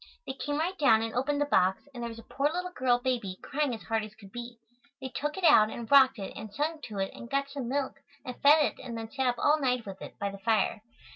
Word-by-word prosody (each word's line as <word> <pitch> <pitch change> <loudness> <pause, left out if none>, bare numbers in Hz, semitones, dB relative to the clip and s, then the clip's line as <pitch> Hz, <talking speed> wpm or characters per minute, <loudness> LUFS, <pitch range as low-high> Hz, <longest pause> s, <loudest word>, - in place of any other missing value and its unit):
They - - -4
came 290 +2 -3
right 345 +5 -1
down 225 -6 +5
and 225 - -4
opened 285 +4 0
the - - +3
box, 190 -5 +2
and 240 - -7
there 235 - -3
was 230 - -9
a 230 - -11
poor 280 +5 0
little 360 +2 -3
girl 250 -6 +2
baby, 245 -7 -2
crying 290 -1 -1
as 220 - -11
hard 225 +3 -1
as 215 0 -9
could 200 -3 -15
be. 240 +1 -7 0.4
They 265 -1 -5
took 295 +4 -3
it 380 - -5
out 215 -10 +7
and 230 +1 -7
rocked 270 -2 +7
it 195 -2 -6
and 215 - -8
sung 300 +7 -2
to 210 -3 -8
it 195 0 -2
and 235 - -10
got 275 0 -1
some 275 -4 -4
milk 275 0 -2 0.3
and 250 - -5
fed 295 +1 +7
it - - -4
and 240 -3 -6
then 225 0 -6
sat 265 -2 0
up 245 -1 +1
all 300 +5 +3
night 250 -4 0
with 195 -1 -8
it, - - -9
by 200 -1 -2
the 200 - -10
fire. 220 0 +1
250 Hz, 275 wpm, -29 LUFS, 220-285 Hz, 0.4 s, out